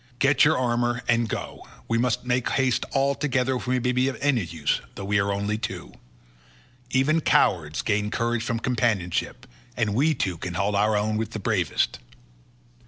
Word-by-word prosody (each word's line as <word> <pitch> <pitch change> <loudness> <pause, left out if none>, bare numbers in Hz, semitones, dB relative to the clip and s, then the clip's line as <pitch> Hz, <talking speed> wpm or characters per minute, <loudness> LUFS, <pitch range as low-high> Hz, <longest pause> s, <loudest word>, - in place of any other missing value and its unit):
Get 135 0 +4
your 160 +2 +4
armour 120 -1 0
and 115 -1 +2
go, - - -5 0.3
we 115 0 +1
must 125 0 0
make 125 0 0
all - - -1
haste 130 -2 +1 0.3
together 130 -3 0
if 125 - -7
we 125 0 +1
may 125 +1 0
be 125 +1 +1
of 135 - -3
any 135 -6 +2
use, 80 -3 -1
though 100 - -6
we 100 +1 +2
are 100 0 +1
only 100 +2 -1
two. - - -6 1.0
Even 150 +5 +2
cowards 80 - +2
gain 105 0 0
courage 115 +1 -1
from 115 0 -2
companionship, 110 -7 -1 0.3
and 110 -4 0
we 150 +7 +2
two 90 -4 -2
can 90 0 -5
hold 100 +3 0
our 105 +1 +2
own 105 +1 0
with 110 +1 -3
the 110 - -4
bravest." 95 -6 0
115 Hz, 180 wpm, -25 LUFS, 100-125 Hz, 1.0 s, Get